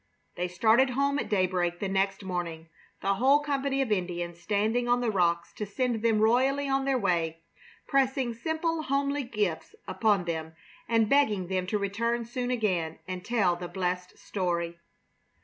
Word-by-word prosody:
They 180 +1 -1
started 225 +8 +4
home 280 +3 +1
at - - -4
daybreak 180 -3 +1
the 200 - -2
next 195 +1 0
morning, 170 -3 -4 0.3
the 195 - +2
whole 265 +8 +4
company 275 -2 0
of 240 - -5
Indians 175 -3 -2
standing 215 +5 0
on 245 0 +4
the 240 -2 0
rocks 170 -3 +1
to 210 - -2
send 240 +1 -1
them 225 -2 +3
royally 265 +5 +3
on 270 0 +1
their 270 -1 +2
way, 165 -6 0 0.4
pressing 265 -2 +1
simple, 320 +6 -1
homely 280 0 0
gifts 210 -9 -2
upon 205 -5 +2
them 160 -1 -4 0.3
and 225 -1 +3
begging 210 -9 +2
them 185 -1 -1
to 210 - 0
return 230 +4 -1
soon 245 +1 -3
again 185 -10 0
and 185 -1 -5
tell 200 -7 +2
the 175 0 -6
blessed 180 0 -3
story. 170 -3 -2
210 Hz, 165 wpm, -28 LUFS, 180-250 Hz, 0.4 s, started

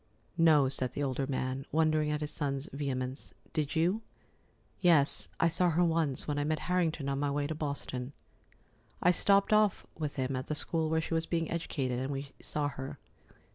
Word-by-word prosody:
"No," 155 -4 +6
said 130 -2 -1
the 145 - -2
older 135 0 -1
man, 130 0 -2
wondering 155 -1 +2
at 150 0 -1
his 150 - -2
son's 140 -2 -2
vehemence. 135 -1 -3 0.2
"Did 150 -3 -1
you?" 175 +7 +2 0.8
"Yes, 165 -5 +3
I 165 - +4
saw 175 +2 +3
her 170 +2 +3
once, 160 -5 +2
when 145 -1 -1
I - - +1
met 155 +1 0
Harrington 165 -5 0
on 140 0 -1
my 145 0 0
way 145 0 -1
to 155 - -2
Boston. 140 -3 -4 0.9
I 180 - +6
stopped 200 +3 +3
off 215 -2 +3
with 150 -2 -4
him 130 0 -1
at 130 0 -4
the 155 - -2
school 160 +1 +1
where 160 0 +2
she 160 - -4
was 165 0 0
being 165 -2 -1
educated, 135 -7 -2
and 130 +2 -2
we 140 0 -4
saw 150 -1 -1
her. 135 0 -7
150 Hz, 190 wpm, -31 LUFS, 135-165 Hz, 0.9 s, No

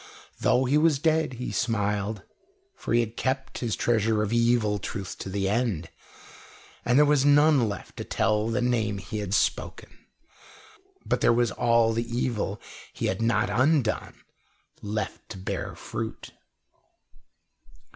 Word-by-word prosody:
Though 130 +1 +3
he 140 +4 +3
was 155 -2 +3
dead, 160 -1 +1
he 125 +1 -5
smiled, 105 -3 -1 0.5
for - - -6
he 120 +1 +4
had 115 0 -4
kept 130 +1 -2
his 115 -3 -1
treasure 110 -2 +1
of 105 +2 -2
evil 115 -3 +2
truth 100 -3 -5
to - - -6
the 95 0 -1
end, 105 -7 -1 0.9
and 120 +2 +2
there 150 - +7
was 145 -2 +3
none 145 -4 +5
left 100 - -8
to - - -4
tell 110 0 0
the 120 +2 0
name 110 -4 0
he 105 +2 -5
had 100 -1 -1
spoken, - - -1 1.1
but - - 0
there - - +5
was 120 -1 +2
all 115 -1 +2
the 115 +1 -3
evil 105 -5 -2 0.3
he - - -4
had 95 +3 -1
not 110 -2 +1
undone 130 0 +1 0.7
left 105 -1 -4
to 100 - -7
bear 95 - -4
fruit. - - -6
115 Hz, 145 wpm, -26 LUFS, 105-125 Hz, 1.1 s, there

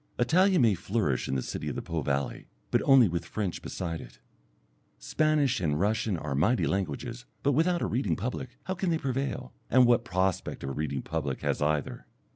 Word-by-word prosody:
Italian 180 +5 +4
may 110 -3 +5
flourish 95 - -1
in - - -1
the 65 - -1
city - - -4
of - - -4
the - - -3
Po 80 -1 -2
valley, 70 -1 -2 0.2
but - - +3
only 135 -4 +7
with 85 -1 -2
French 100 -5 -3
beside 85 -2 -4
it. - - -13 0.8
Spanish 145 - +1
and 75 -4 0
Russian 105 0 +1
are 75 -3 -4
mighty 95 - +2
languages, 100 - -3 0.2
but 140 - +3
without 170 +5 +2
a - - +1
reading 105 -9 0
public 125 +5 -5
how 190 - -2
can 190 0 -1
they 165 - +2
prevail, 135 -2 -3 0.2
and 130 -1 +6
what 120 -1 +4
prospect 95 -4 -1
of 70 - -3
a - - -4
reading 70 -2 -3
public - - -3
has - - -1
either? 75 -1 -1
110 Hz, 195 wpm, -28 LUFS, 80-130 Hz, 0.8 s, only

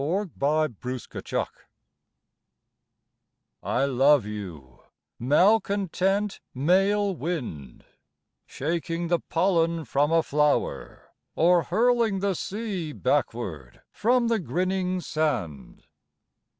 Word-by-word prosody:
NORTH 180 +6 -1
WIND 150 -4 0 2.8
I 135 - 0
love 135 -1 +4
you, 90 -12 -8 0.4
malcontent 195 - +2 0.2
Male 195 +7 +2
wind 120 - -5 0.6
Shaking 165 +3 -3
the 175 -1 +2
pollen 165 -2 +1
from 145 +5 +1
a 165 0 +4
flower 150 0 -1 0.2
Or 175 +1 +4
hurling 230 +3 +2
the 200 0 0
sea 190 -5 -4
backward 100 - -2
from 240 +2 +2
the 230 -1 +1
grinning 185 +4 -1
sand. 110 - -3
165 Hz, 85 wpm, -26 LUFS, 140-195 Hz, 2.8 s, love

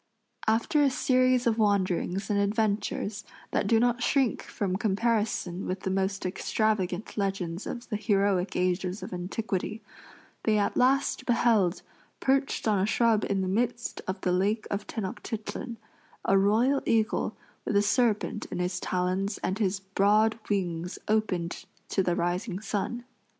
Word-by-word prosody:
After 225 +7 +2
a 285 - +5
series 255 -1 +2
of 230 -1 +2
wanderings 195 -2 +1
and 200 - +2
adventures 205 0 0 0.3
that - - +1
do 225 +1 +4
not 240 +1 +2
shrink 265 -1 +2
from 190 -3 -3
comparison 210 -3 0
with 185 +1 -3
the 190 - -2
most 195 0 -1
extravagant 195 0 -1
legends 190 -3 -2
of 240 0 -6
the 210 - -1
heroic 200 -2 +1
ages 180 +1 0
of - - -7
antiquity, 195 +3 -3 0.6
they 215 -1 +2
at 205 - +1
last 265 +2 +2
beheld 225 -6 +3 0.4
perched 270 -2 +1
on 210 -3 +3
a 190 - +2
shrub 225 -1 +3
in 195 -1 +1
the 190 - -1
midst 235 +4 -1
of 190 +1 -2
the 180 - +1
lake 200 +5 +1
of 200 +1 -2
Tenochtitlan 220 +2 -5 0.5
a 195 - +4
royal 225 +8 +3
eagle 225 -1 +1 0.3
with 210 - -2
a 200 - +5
serpent 215 -1 +1
in - - -5
his 180 0 -1
talons 185 +3 -1
and 190 +3 -1
his 195 -2 0
broad 210 +3 +2
wings 175 -3 -1
opened 185 -5 0 0.2
to 195 - +1
the 175 -2 +1
rising 180 +3 -1
sun. 215 +3 -3
205 Hz, 150 wpm, -28 LUFS, 190-225 Hz, 0.6 s, a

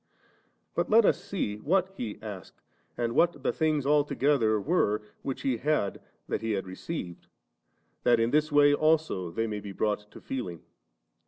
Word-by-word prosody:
But 170 - -1
let 225 0 +6
us - - +2
see 105 - -3
what 185 - +1
He 110 - -5
asked, 100 -5 -9 0.3
and 120 -1 -1
what 170 +5 +2
the - - +1
things 155 -3 +1
altogether 140 -6 +2
were 105 - +1 0.2
which 135 - -4
He 125 -4 0
said 145 -7 0 0.3
that - - -2
He 115 -1 -1
had 95 -2 -2
received, 95 - -6 0.7
that 120 -1 +4
in 115 +1 +2
this 150 +1 +2
way 145 0 +6
also 155 - +1
they 115 +7 -1
may 105 -2 -3
be 100 -1 -8
brought 105 +1 -1
to - - -12
feeling. 90 -11 -5
125 Hz, 165 wpm, -28 LUFS, 105-150 Hz, 0.7 s, let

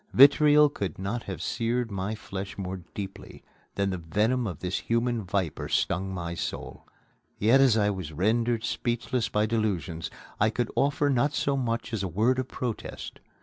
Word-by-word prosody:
Vitriol 150 +2 +7
could 100 - -4
not 100 +5 -3
have 95 -3 -5
seared 115 0 -1
my 100 +2 -2
flesh 100 -2 -6
more 95 -1 -4 0.2
deeply 100 -1 -7 0.3
than 100 -1 +1
the 90 - -3
venom 105 +9 +1
of 90 -6 -4
this 90 +4 -2
human 115 0 0
viper 90 -4 -2
stung 95 +2 0
my 85 -2 -4
soul! 85 - -5 0.5
Yet, 120 +6 +5
as 125 -5 +5
I 105 -1 +3
was 95 -6 -5
rendered 115 +7 +1
speechless 120 -1 -1
by 105 0 +2
delusions, 100 -7 -1 0.3
I 105 - +4
could 120 +1 -2
offer 145 +1 +2
not 140 +3 +2
so 140 - +1
much 115 -3 -2
as 110 - -1
a 95 - -1
word 110 +9 +2
of 130 - -2
protest. 120 -4 -5
110 Hz, 170 wpm, -27 LUFS, 95-120 Hz, 0.5 s, Vitriol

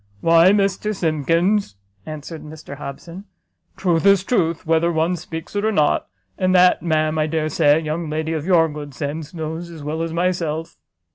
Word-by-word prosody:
"Why, 165 - +5
Mr 200 +1 +1
Simkins," 165 - +1 0.3
answered 155 +1 -7
Mr 150 -2 -10
Hobson, 165 +7 -8 0.5
"truth 170 -4 +1
is 200 -2 +5
truth, 170 -7 0
whether 165 +1 +2
one 165 +2 +1
speaks 165 +1 -8
it 205 - 0
or 220 - +2
not; 155 -8 +1 0.3
and 185 0 +2
that, 180 0 +5
ma'am, 155 -1 0
I 155 - +1
dare 155 0 -1
say, 145 -1 +4
a - - -1
young 155 +1 -3
lady 155 +1 -2
of 155 -2 -2
your 170 -3 +5
good 145 -3 -8
sense 150 +1 -5
knows 165 0 -5
as 160 -3 -10
well 155 +2 -3
as 165 0 -2
myself." 165 -2 -2
165 Hz, 180 wpm, -21 LUFS, 155-175 Hz, 0.5 s, Why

